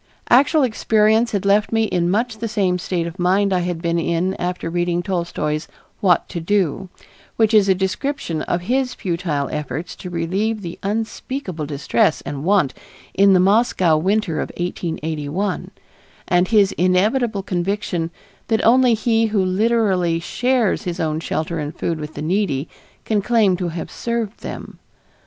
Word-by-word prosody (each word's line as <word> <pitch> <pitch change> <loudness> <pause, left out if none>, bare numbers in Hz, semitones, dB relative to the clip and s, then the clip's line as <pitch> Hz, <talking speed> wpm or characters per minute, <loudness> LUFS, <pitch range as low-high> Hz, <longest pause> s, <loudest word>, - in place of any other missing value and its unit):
Actual 285 +4 +5
experience 220 -1 +2
had 200 -2 -2
left 205 +1 +3
me 225 -1 +2
in 175 -5 0
much 220 +3 0
the 230 - -2
same 190 -4 0
state 175 -1 -2
of 170 +2 -7
mind 190 +2 +2
I 185 - +2
had 175 -1 -3
been 170 0 +1
in 170 +3 0
after 180 -1 -3
reading 175 +1 -1
Tolstoy's 170 -5 -2 0.3
"What 180 -4 +3
to 175 - -4
Do," 190 0 0 0.5
which 220 0 +2
is 205 -2 +5
a 190 - +5
description 190 - -2
of 175 - -1
his 250 +6 0
futile 170 -6 -2
efforts 150 +2 -4
to 180 - -7
relieve 195 +6 -1
the 170 -1 -7
unspeakable 210 - -3
distress 140 -1 +1
and 140 -1 -6
want 185 -7 +2 0.4
in 195 0 +5
the 185 - +5
Moscow 190 -4 +3
winter 185 0 0
of - - -4
1881, 165 +1 -3 0.6
and 180 0 +3
his 205 -3 +4
inevitable 200 +4 +2
conviction 180 -2 -2 0.4
that 220 -1 +1
only 245 0 +5
he 225 0 +2
who 205 -3 +1
literally 190 -4 +1
shares 245 +4 0
his 180 -3 -4
own 155 -2 -1
shelter 160 0 -3
and 150 +1 -4
food 165 -2 -2
with 150 0 -7
the 150 - -5
needy 160 -5 0 0.4
can 215 -2 +1
claim 215 -4 +3
to 180 -1 -2
have 165 0 -5
served 235 -2 -3
them. - - -8
185 Hz, 160 wpm, -20 LUFS, 170-215 Hz, 0.6 s, Actual